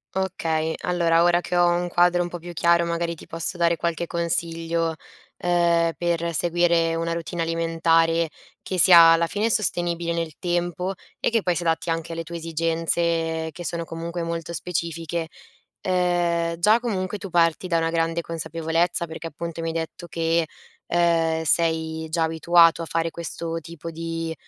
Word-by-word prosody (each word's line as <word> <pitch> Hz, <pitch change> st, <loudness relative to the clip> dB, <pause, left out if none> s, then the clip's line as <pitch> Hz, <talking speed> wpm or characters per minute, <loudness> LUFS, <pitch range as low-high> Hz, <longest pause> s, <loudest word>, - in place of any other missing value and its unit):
Okay. 160 Hz, -4 st, -1 dB
Allora, 170 Hz, -2 st, +2 dB
ora 175 Hz, 0 st, +4 dB
che 180 Hz, 0 st, -4 dB
ho 175 Hz, 0 st, +5 dB
un 175 Hz, +1 st, 0 dB
quadro 175 Hz, 0 st, +3 dB
un 175 Hz, -, -1 dB
po' 175 Hz, 0 st, -6 dB
più 175 Hz, +1 st, -9 dB
chiaro, 170 Hz, 0 st, +3 dB
magari, 170 Hz, 0 st, -2 dB
ti -, -, -14 dB
posso 165 Hz, +2 st, -4 dB
dare 170 Hz, -1 st, +2 dB
qualche 170 Hz, 0 st, -2 dB
consiglio, 165 Hz, -1 st, -1 dB, 0.4 s
uhm, 170 Hz, -1 st, +2 dB
per 170 Hz, -1 st, -1 dB
seguire 170 Hz, 0 st, +2 dB
una 165 Hz, 0 st, -1 dB
routine 170 Hz, +1 st, -4 dB
alimentare 165 Hz, 0 st, +2 dB, 0.3 s
che 185 Hz, -, -4 dB
sia 170 Hz, -2 st, +8 dB
alla 165 Hz, 0 st, +2 dB
fine 210 Hz, +6 st, -1 dB
sostenibile 175 Hz, -6 st, 0 dB
nel 165 Hz, -2 st, -2 dB
tempo, 175 Hz, +1 st, -2 dB, 0.2 s
e -, -, 0 dB
che 230 Hz, -1 st, +1 dB
poi 180 Hz, -1 st, +1 dB
si 175 Hz, -, -2 dB
adatti 165 Hz, 0 st, 0 dB
anche 165 Hz, 0 st, -2 dB
alle 165 Hz, 0 st, -4 dB
tue 170 Hz, +1 st, -8 dB
esigenze 165 Hz, 0 st, -1 dB
che 175 Hz, -, -8 dB
sono, 170 Hz, +1 st, -3 dB
comunque, 170 Hz, +1 st, -5 dB
molto 165 Hz, 0 st, -4 dB
specifiche. 170 Hz, -1 st, -3 dB, 0.5 s
Uhm, 175 Hz, -2 st, +1 dB
già 210 Hz, +7 st, +4 dB
comunque 210 Hz, -4 st, -2 dB
tu 195 Hz, -, -8 dB
parti 170 Hz, +1 st, +2 dB
da 170 Hz, -2 st, +1 dB
una 165 Hz, 0 st, +1 dB
grande 165 Hz, 0 st, 0 dB
consapevolezza 165 Hz, +1 st, -1 dB
perché, 165 Hz, 0 st, -7 dB
appunto, 170 Hz, +1 st, -6 dB
mi 165 Hz, -, -3 dB
hai 165 Hz, -, -2 dB
detto 165 Hz, +1 st, -5 dB
che, 165 Hz, 0 st, 0 dB, 0.4 s
uhm, 165 Hz, -2 st, +2 dB
sei 160 Hz, 0 st, 0 dB
già 165 Hz, +1 st, 0 dB
abituato 165 Hz, +1 st, +4 dB
a -, -, -3 dB
fare 165 Hz, +1 st, -1 dB
questo 165 Hz, 0 st, -5 dB
tipo 165 Hz, 0 st, -9 dB
di, 165 Hz, 0 st, -4 dB
170 Hz, 165 wpm, -24 LUFS, 165-175 Hz, 0.5 s, sia